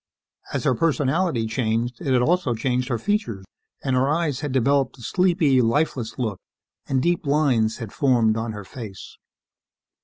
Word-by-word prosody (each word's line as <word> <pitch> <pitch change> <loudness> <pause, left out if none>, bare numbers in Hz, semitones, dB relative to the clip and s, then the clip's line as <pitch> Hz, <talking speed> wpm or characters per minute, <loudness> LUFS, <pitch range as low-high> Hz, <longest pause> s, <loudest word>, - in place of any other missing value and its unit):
As - - -2
her - - +3
personality 150 -1 +1
changed, 115 +1 -1
it 135 - -1
had 125 -1 +3
also 170 -5 +1
changed 125 +2 -1
her 120 - 0
features, 115 - -2 0.4
and 130 -1 0
her 130 +2 +2
eyes 155 -3 0
had 150 -3 -3
developed 135 +1 +1
a 120 - -13
sleepy, 170 - +3
lifeless 120 -1 0
look, 110 -7 -2 0.5
and 130 -1 0
deep 175 0 +1
lines 130 -7 +2
had 115 -5 -7
formed 120 -6 +3
on 115 0 -2
her 105 -1 -7
face. 105 -3 -9
130 Hz, 160 wpm, -23 LUFS, 115-145 Hz, 0.5 s, her